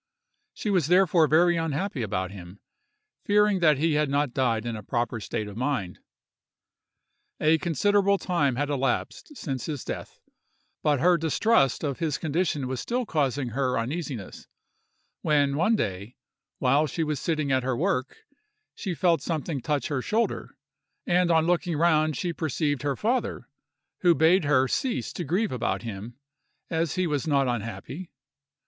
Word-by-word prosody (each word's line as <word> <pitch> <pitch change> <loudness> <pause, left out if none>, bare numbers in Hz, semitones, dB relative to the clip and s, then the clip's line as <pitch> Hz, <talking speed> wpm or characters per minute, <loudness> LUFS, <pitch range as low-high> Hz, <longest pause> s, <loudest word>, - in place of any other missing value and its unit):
She 210 - -2
was 180 -7 +2
therefore 180 -2 +4
very 170 +3 +4
unhappy 165 0 -2
about 95 -3 -2
him, 95 0 -11 0.6
fearing 210 -1 +3
that 155 -4 +4
he 160 +2 +1
had 150 -1 +1
not 140 -2 0
died 120 -4 0
in 120 -1 -3
a 105 - -6
proper 120 0 -2
state 105 0 -4
of 100 - -9
mind. 125 -7 -2 1.4
A 160 +1 +3
considerable 200 +5 +2
time 150 -9 0
had 145 +3 -1
elapsed 135 - -2
since 135 -5 -4
his 145 -5 -4
death, - - -6 0.6
but 145 -3 +2
her 175 +1 +5
distrust 160 - +2
of 140 -3 -2
his 160 -4 -1
condition 155 -3 -1
was 130 -1 -3
still 245 - -2
causing 140 - 0
her 130 +1 0
uneasiness; 130 - -5 0.7
when 145 -2 +2
one 180 +9 +3
day, 100 - -3 0.4
while 140 +4 +3
she 165 +3 -2
was 150 -2 -2
sitting 155 -4 -1
at 130 0 +3
her 130 -1 -1
work, 145 -5 -1 0.5
she 190 -5 -4
felt 170 +2 +2
something 155 -4 -3
touch 145 +2 -1
her 140 -4 -1
shoulder, 225 - -2 0.5
and 180 0 +2
on 160 -1 +4
looking 175 -1 0
round 155 -3 +2
she 175 -2 -2
perceived 150 -3 -1
her 140 -1 -1
father, 245 - -1 0.5
who 175 -2 +4
bade 165 +2 +4
her 135 -2 +3
cease 250 - -2
to 180 - -4
grieve 185 +8 0
about 125 -1 -2
him, 110 +1 -7 0.6
as 165 0 0
he 185 -1 +1
was 150 -1 -1
not 140 -3 +2
unhappy. 120 - -5
150 Hz, 155 wpm, -26 LUFS, 130-175 Hz, 1.4 s, her